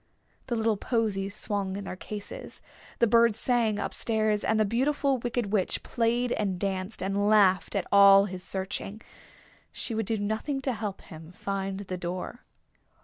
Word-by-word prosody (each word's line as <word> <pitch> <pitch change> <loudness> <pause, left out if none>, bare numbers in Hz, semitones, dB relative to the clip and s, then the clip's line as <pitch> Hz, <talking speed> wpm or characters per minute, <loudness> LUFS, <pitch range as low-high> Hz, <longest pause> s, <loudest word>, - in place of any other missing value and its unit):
The 240 - -1
little 225 -1 +1
posies 200 -3 -1
swung 200 -3 -2
in 200 - -5
their 185 - -6
cases, 205 +2 -8 0.4
the 235 - +4
bird 230 -1 +4
sang 230 -2 +1
up - - -3
stairs, 215 -2 +1
and 220 - +1
the 215 - +4
Beautiful 270 +4 +1
Wicked 235 -3 -2
Witch 195 -4 +1
played 240 +1 0
and 195 -5 -1
danced, 190 0 -3
and 200 +2 +1
laughed 195 -4 +4
at - - 0
all 200 0 +8
his 185 -2 -6
searching. 195 +3 -4 0.7
She 235 - -5
would 220 -2 -2
do 225 - 0
nothing 220 +7 -2
to 260 - 0
help 210 -3 -5
him 160 +1 -12
find 195 +1 -4
the 185 -2 -5
door. 180 +6 -5
210 Hz, 165 wpm, -28 LUFS, 195-230 Hz, 0.7 s, all